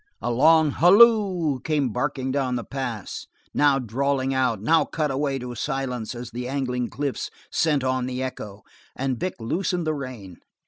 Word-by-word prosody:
A 120 Hz, -, -2 dB
long 155 Hz, +4 st, +5 dB
halloo 185 Hz, -, +5 dB
came 145 Hz, -1 st, 0 dB
barking 130 Hz, +2 st, -2 dB
down 130 Hz, -2 st, 0 dB
the 120 Hz, -, -3 dB
pass, 125 Hz, -7 st, -5 dB, 0.3 s
now 145 Hz, -2 st, +4 dB
drawling 135 Hz, +2 st, -1 dB
out, 125 Hz, -5 st, +1 dB
now 160 Hz, +10 st, +3 dB
cut 155 Hz, -3 st, -2 dB
away 135 Hz, 0 st, -1 dB
to 125 Hz, -1 st, -6 dB
silence 125 Hz, -2 st, -3 dB
as 120 Hz, +1 st, -7 dB
the 125 Hz, +2 st, -5 dB
angling 125 Hz, -3 st, -2 dB
cliffs 140 Hz, +3 st, -3 dB, 0.2 s
sent 150 Hz, -4 st, +1 dB
on 130 Hz, -1 st, 0 dB
the 130 Hz, 0 st, -3 dB
echo, 105 Hz, -5 st, -7 dB, 0.3 s
and 130 Hz, -3 st, -2 dB
Vic 185 Hz, -, -2 dB
loosened 175 Hz, -, -1 dB
the 155 Hz, -, 0 dB
rein. 125 Hz, -, -7 dB
135 Hz, 165 wpm, -24 LUFS, 125-150 Hz, 0.3 s, long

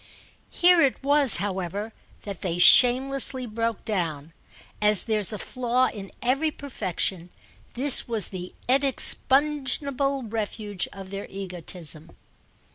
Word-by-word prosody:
Here 355 Hz, -1 st, +3 dB
it 270 Hz, -2 st, 0 dB
was, 285 Hz, -3 st, +6 dB
however, 195 Hz, +3 st, -4 dB, 0.3 s
that 200 Hz, -4 st, -8 dB
they 175 Hz, -2 st, -3 dB
shamelessly 255 Hz, +5 st, +4 dB
broke 230 Hz, -1 st, -4 dB
down; 165 Hz, -7 st, -4 dB, 0.5 s
as 210 Hz, -1 st, +5 dB
there's 215 Hz, -4 st, -2 dB
a 210 Hz, -, -5 dB
flaw 255 Hz, +3 st, -1 dB
in 195 Hz, -3 st, -10 dB
every 275 Hz, +6 st, 0 dB
perfection 190 Hz, -, -4 dB, 0.5 s
this 270 Hz, +2 st, +5 dB
was 225 Hz, -6 st, +1 dB
the 180 Hz, -1 st, -9 dB
inexpugnable 275 Hz, +1 st, +1 dB
refuge 210 Hz, -3 st, -5 dB
of 195 Hz, -1 st, -12 dB
their 200 Hz, 0 st, -7 dB
egotism. 175 Hz, -4 st, -5 dB
220 Hz, 115 wpm, -24 LUFS, 190-265 Hz, 0.5 s, was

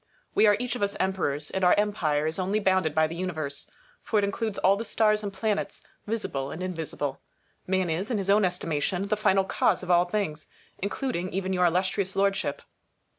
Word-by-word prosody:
We 220 Hz, -, +5 dB
are 205 Hz, -1 st, +5 dB
each 250 Hz, 0 st, -2 dB
of 245 Hz, -, -5 dB
us 200 Hz, 0 st, 0 dB
emperors, 155 Hz, -6 st, -1 dB
and 190 Hz, -, -2 dB
our 180 Hz, -, +6 dB
empire 165 Hz, -8 st, +1 dB
is 160 Hz, +3 st, -2 dB
only 195 Hz, +3 st, +1 dB
bounded 185 Hz, -6 st, +1 dB
by 160 Hz, 0 st, +4 dB
the 155 Hz, -, -4 dB
Universe, 160 Hz, -5 st, -4 dB, 0.3 s
for 220 Hz, -, -1 dB
it 205 Hz, -, +3 dB
includes 210 Hz, +1 st, -2 dB
all 195 Hz, +1 st, +4 dB
the 215 Hz, -, -4 dB
stars 215 Hz, -1 st, +2 dB
and 205 Hz, -1 st, -4 dB
planets, 205 Hz, +2 st, -2 dB, 0.2 s
visible 140 Hz, -11 st, -2 dB
and 160 Hz, -, -6 dB
invisible. 160 Hz, -6 st, -3 dB, 0.5 s
Man 190 Hz, -1 st, +1 dB
is, 170 Hz, +6 st, -2 dB
in 240 Hz, -, 0 dB
his 195 Hz, -2 st, -3 dB
own 205 Hz, +1 st, +4 dB
estimation, 180 Hz, 0 st, -1 dB
the 215 Hz, -, +2 dB
final 195 Hz, -2 st, +3 dB
cause 190 Hz, -, +1 dB
of 180 Hz, -, -1 dB
all 175 Hz, 0 st, +5 dB
things, 175 Hz, -5 st, -3 dB, 0.3 s
including 200 Hz, -2 st, -2 dB
even 190 Hz, 0 st, -2 dB
your 180 Hz, -1 st, +3 dB
Illustrious 185 Hz, +2 st, 0 dB
Lordship. 195 Hz, 0 st, 0 dB
190 Hz, 195 wpm, -27 LUFS, 170-205 Hz, 0.5 s, our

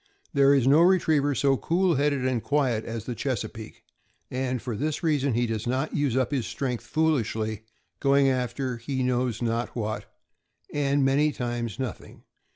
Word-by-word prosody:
There 140 Hz, -1 st, +5 dB
is 135 Hz, -3 st, +2 dB
no 145 Hz, +5 st, +6 dB
retriever 160 Hz, -6 st, +3 dB
so 135 Hz, 0 st, +2 dB
cool 175 Hz, +4 st, +1 dB
headed 140 Hz, -2 st, +1 dB
and 130 Hz, -3 st, 0 dB
quiet 130 Hz, -6 st, 0 dB
as 115 Hz, -1 st, -5 dB
the 125 Hz, -, -3 dB
Chesapeake; 115 Hz, -3 st, -5 dB, 0.5 s
and 130 Hz, 0 st, -1 dB
for 120 Hz, -1 st, -4 dB
this 150 Hz, +8 st, -2 dB
rea 155 Hz, -3 st, +2 dB
son 135 Hz, -3 st, 0 dB
he 120 Hz, +1 st, +2 dB
does 110 Hz, -1 st, -3 dB
not 130 Hz, +5 st, -1 dB
use 140 Hz, -4 st, +1 dB
up 130 Hz, 0 st, +1 dB
his 130 Hz, -5 st, -1 dB
strength 125 Hz, -4 st, -3 dB
foolishly, 110 Hz, -9 st, 0 dB, 0.3 s
going 140 Hz, 0 st, +4 dB
after 125 Hz, -1 st, -1 dB
he 130 Hz, +2 st, -3 dB
knows 125 Hz, -2 st, 0 dB
not 115 Hz, +1 st, -2 dB
what, 110 Hz, -2 st, -4 dB, 0.6 s
and 140 Hz, -1 st, +2 dB
many 145 Hz, +3 st, +3 dB
times 120 Hz, -4 st, -3 dB
nothing. 130 Hz, -4 st, -6 dB
130 Hz, 165 wpm, -26 LUFS, 120-140 Hz, 0.6 s, no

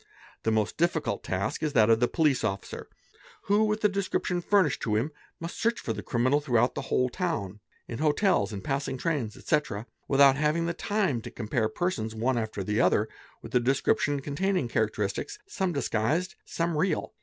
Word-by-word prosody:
© -, -, -28 dB, 0.4 s
The -, -, 0 dB
most 110 Hz, -1 st, 0 dB
difficult 160 Hz, -, 0 dB
task 95 Hz, +8 st, -2 dB
is 155 Hz, -2 st, -1 dB
that 115 Hz, -4 st, +5 dB
of 115 Hz, -, +5 dB
the 120 Hz, -, +3 dB
police 150 Hz, -5 st, +2 dB
officer 100 Hz, -2 st, -3 dB, 0.6 s
who 205 Hz, +2 st, +3 dB
with 215 Hz, 0 st, -1 dB
the 210 Hz, -, +5 dB
deserip 195 Hz, -2 st, -1 dB
tion 175 Hz, -1 st, 0 dB
furnished 185 Hz, -6 st, +2 dB
to 105 Hz, -3 st, 0 dB
him 120 Hz, +9 st, 0 dB, 0.3 s
must 165 Hz, +1 st, -6 dB
search 230 Hz, +1 st, +1 dB
for -, -, -3 dB
the -, -, -5 dB
criminal 130 Hz, +4 st, +1 dB
throughout 120 Hz, -4 st, +2 dB
the -, -, -3 dB
whole 125 Hz, -, +2 dB
town, 120 Hz, -, -3 dB, 0.3 s
in 115 Hz, -, -6 dB
hotels, 150 Hz, -, +2 dB
in 100 Hz, -2 st, -5 dB
passing 135 Hz, -1 st, -2 dB
trains, 130 Hz, -8 st, -2 dB
etc., 135 Hz, -9 st, -1 dB, 0.2 s
without 135 Hz, -1 st, +6 dB
having 155 Hz, +3 st, +1 dB
the 170 Hz, -, -1 dB
time 190 Hz, -, 0 dB
to -, -, -7 dB
compare 110 Hz, 0 st, -1 dB
persons, 110 Hz, -6 st, -2 dB
one 120 Hz, +2 st, +1 dB
after 110 Hz, -3 st, -3 dB
the 105 Hz, +4 st, +1 dB
other, 105 Hz, +4 st, +3 dB, 0.3 s
with -, -, -10 dB
a 125 Hz, -, +5 dB
description 135 Hz, +3 st, +1 dB
containing 160 Hz, +2 st, 0 dB
characteristics, 110 Hz, -, -1 dB
| -, -, -57 dB
some 190 Hz, -, -1 dB
disguised, 145 Hz, -, 0 dB
some 165 Hz, 0 st, -1 dB
real. 155 Hz, +1 st, 0 dB
140 Hz, 190 wpm, -28 LUFS, 110-170 Hz, 0.6 s, without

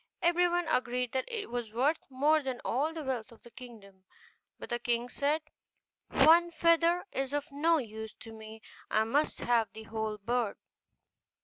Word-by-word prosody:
Everyone 350 Hz, 0 st, +2 dB
agreed 250 Hz, -3 st, 0 dB
that 260 Hz, -1 st, -1 dB
it 450 Hz, -, -5 dB
was 240 Hz, -3 st, -3 dB
worth 280 Hz, +7 st, +2 dB
more 295 Hz, +4 st, +3 dB
than 260 Hz, -3 st, -4 dB
all 285 Hz, +7 st, 0 dB
the 325 Hz, -1 st, -6 dB
wealth 245 Hz, -6 st, -3 dB
of 230 Hz, -, -17 dB
the 235 Hz, -, -14 dB
kingdom: 215 Hz, -6 st, -13 dB, 0.5 s
but -, -, -10 dB
the 240 Hz, -, 0 dB
king 240 Hz, 0 st, -1 dB
said, 295 Hz, +4 st, 0 dB, 0.7 s
'One 330 Hz, +5 st, +6 dB
feather 335 Hz, +1 st, +3 dB
is 270 Hz, 0 st, -3 dB
of 290 Hz, +1 st, -3 dB
no 320 Hz, +4 st, +3 dB
use 220 Hz, -4 st, -6 dB
to 225 Hz, -, -10 dB
me, 220 Hz, 0 st, -11 dB, 0.3 s
I 215 Hz, -, +3 dB
must 280 Hz, +8 st, 0 dB
have 230 Hz, -2 st, +2 dB
the 220 Hz, 0 st, -9 dB
whole 220 Hz, -1 st, -3 dB
bird. 230 Hz, +1 st, -1 dB
250 Hz, 170 wpm, -31 LUFS, 225-315 Hz, 0.7 s, One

